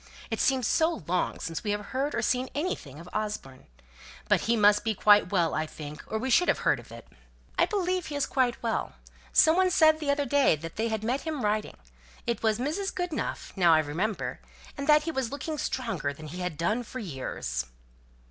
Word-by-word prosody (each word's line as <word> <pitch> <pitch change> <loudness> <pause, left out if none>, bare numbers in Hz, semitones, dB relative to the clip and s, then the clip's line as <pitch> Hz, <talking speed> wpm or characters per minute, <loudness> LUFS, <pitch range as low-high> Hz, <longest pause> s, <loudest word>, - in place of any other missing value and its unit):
It - - -1
seems 260 -3 +2
so 325 - +1
long 180 +2 -1
since 165 -1 -4
we 210 - -2
have 205 0 -1
heard 275 +3 -1
or - - -1
seen 255 +1 +1
anything 225 - -3
of 170 - -11
Osborne. 210 -12 -4 0.6
But - - +3
he 235 +1 +1
must 210 0 +5
be 220 -1 0
quite 205 -2 +5
well, 175 -5 +2
I 155 0 -1
think, 150 -1 -9
or 220 - -2
we 260 +4 -2
should 355 +8 +5
have - - +3
heard - - +3
of - - -14
it." - - -11 0.5
"I - - +5
believe 370 -4 -1
he 295 - -5
is 285 - +1
quite 250 -3 0
well. 230 -2 -1 0.4
Some 320 +1 +6
one 370 0 +4
said 315 -3 +5
the 300 -2 -3
other 285 0 +2
day 285 - +4
that 165 +2 -8
they 225 +1 0
had 220 -1 -2
met 250 +5 0
him 310 -7 -3
riding 210 +1 -1 0.5
it 235 -1 -1
was 220 -1 +2
Mrs. 315 +10 -2
Goodenough, 355 -4 -3
now 175 -4 +5
I - - +5
remember 170 +8 -2 0.4
and 280 -1 -5
that 300 0 +6
he 325 - -2
was 265 -6 -2
looking 295 +2 -4
stronger 195 - -2
than 155 +1 -10
he 175 +4 -7
had 180 -4 -3
done 210 +9 0
for 245 +2 -8
years." 130 - -4
225 Hz, 215 wpm, -28 LUFS, 180-285 Hz, 0.6 s, Some